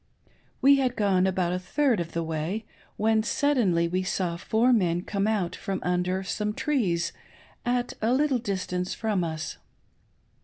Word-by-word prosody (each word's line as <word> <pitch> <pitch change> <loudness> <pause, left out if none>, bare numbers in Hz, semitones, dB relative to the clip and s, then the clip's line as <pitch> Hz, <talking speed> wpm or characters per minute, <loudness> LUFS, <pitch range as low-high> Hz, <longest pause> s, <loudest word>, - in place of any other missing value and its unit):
We 280 +1 +7
had 255 -2 +1
gone 190 -3 +2
about 180 -2 0
a 180 - -1
third 245 +4 +1
of 170 -1 -4
the 165 - -1
way, 165 +7 -3 0.3
when 220 +1 +3
we - - +3
suddenly 185 -10 +1
saw 185 -2 -1
four 225 +8 +2
men 175 -5 +2
come 200 +1 -1
out 205 -6 0
from 195 -2 -3
under 180 +1 0
some 210 +2 -2
trees 195 - 0 0.5
at 245 0 0
a 225 +2 +2
little 270 -1 +2
distance 185 -4 -2
from 210 -5 0
us. 160 - -4
195 Hz, 155 wpm, -27 LUFS, 180-225 Hz, 0.5 s, We